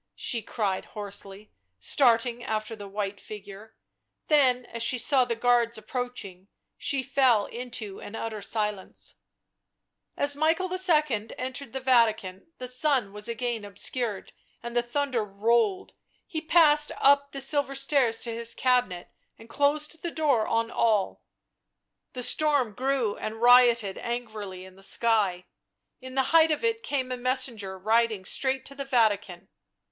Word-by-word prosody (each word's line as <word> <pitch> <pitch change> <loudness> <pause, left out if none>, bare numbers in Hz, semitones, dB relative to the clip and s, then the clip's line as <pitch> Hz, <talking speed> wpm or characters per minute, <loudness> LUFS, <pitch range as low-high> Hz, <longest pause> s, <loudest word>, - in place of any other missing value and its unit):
she 235 - 0
cried 205 -3 -2
hoarsely, 200 0 -6 0.3
starting 240 - +2
after 220 0 -3
the 205 -2 -9
white 200 0 -4
figure; 205 +1 -11 0.5
then, 255 -5 +3
as 230 - -7
she 240 +2 +2
saw 260 +1 +3
the 235 -1 -2
guards 235 -1 +2
approaching, 215 -5 -6 0.3
she 275 -3 -2
fell 255 -5 +3
into 235 -4 -6
an 205 - -9
utter 220 -2 -5
silence. 210 -2 -4 1.0
As 285 0 +3
Michael 325 +5 0
II. 300 - +2
entered 260 0 -5
the 265 - -4
Vatican 225 - +1
the 250 - -6
sun 255 -5 +1
was 210 0 -2
again 235 -1 -3
obscured 205 +1 -3 0.3
and 235 0 -7
the 240 - +3
thunder 245 -1 -2
rolled; 210 0 0 0.3
he 320 -5 -5
passed 310 -2 +5
up 280 0 +4
the 275 - -6
silver 275 0 +1
stairs 270 -4 +2
to 235 - -1
his 230 0 -2
cabinet 245 -9 0 0.3
and 225 +1 -16
closed 300 +2 0
the 345 - -3
door 285 -9 +1
on 230 0 0
all. 215 -4 0 0.9
The 250 - -4
storm 285 -6 +2
grew 255 -3 -1
and 220 +1 -6
rioted 240 -4 +5
angrily 215 -6 -6
in 190 0 -15
the 195 - -18
sky; 195 -4 +1 0.5
in 260 0 -10
the 265 - +3
height 325 -1 +6
of 305 +5 -1
it 455 -1 0
came 270 - -3
a 250 - -3
messenger 240 -6 -2
riding 220 0 +1
straight 265 +4 0
to 275 - -7
the 275 0 -5
Vatican. 205 -8 0
235 Hz, 145 wpm, -26 LUFS, 210-270 Hz, 1.0 s, height